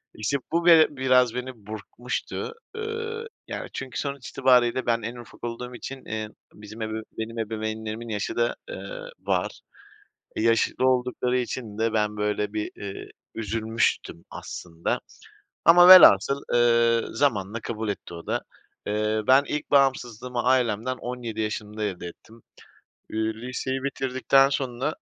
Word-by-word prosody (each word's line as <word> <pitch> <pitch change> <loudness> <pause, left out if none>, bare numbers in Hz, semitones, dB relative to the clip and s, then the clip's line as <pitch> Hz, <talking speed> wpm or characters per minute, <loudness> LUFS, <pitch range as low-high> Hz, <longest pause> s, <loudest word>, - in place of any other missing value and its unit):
İşte 110 +7 -1
bu, 170 +1 +1
be 165 -2 +8
biraz 130 -3 +3
beni 125 +1 -3 0.2
burkmuştu. 120 - -5 0.2
Iıı, 450 +1 -4 0.2
yani, - - -5
çünkü, 130 -4 -5
sonuç 140 -2 -4
itibariyle, 125 -1 +3
ben 115 -1 +1
en 115 +3 -5
ufak 120 0 -13
olduğum 125 +1 -5
için, 135 +2 -8
eee, 110 -1 -4 0.2
bizim 105 +2 -11
ebeveyn 110 0 -3
benim 115 +1 -4
ebeveynlerimin 110 +1 -4
yaşı 105 -2 -3
da, 120 0 +1
ııı, - - -7
var. - - -2 0.7
E, - - -2
yaşı 115 0 +2
da 130 - +2
oldukları 125 0 +1
için 120 -3 -4
de, 110 0 0
ben 105 -1 0
böyle 105 0 -1
bir, 105 -1 -3
iii, 100 -1 -7 0.2
üzülmüştüm 110 -5 -1
aslında. 85 -1 -4 0.7
Ama 175 +1 +8
velhasıl, 140 - +9
ııı, 115 -1 +3
zamanla 115 -6 0
kabul 110 -2 -4
etti 100 -3 -5
o 85 - -9
da. - - 0 0.5
Eee, 105 +1 0
ben 135 +2 +6
ilk 150 +1 -4
bağımsızlığımı 125 -3 +1
ailemden, 125 -1 +1
17 120 -3 -5
yaşımda 105 0 -4
elde 90 -4 -3
ettim. 110 +6 -14 0.7
İii, 110 0 -1
liseyi 125 +3 -4
bitirdikten 135 0 +3
sonra 135 +1 -2
120 Hz, 140 wpm, -25 LUFS, 110-130 Hz, 0.7 s, velhasıl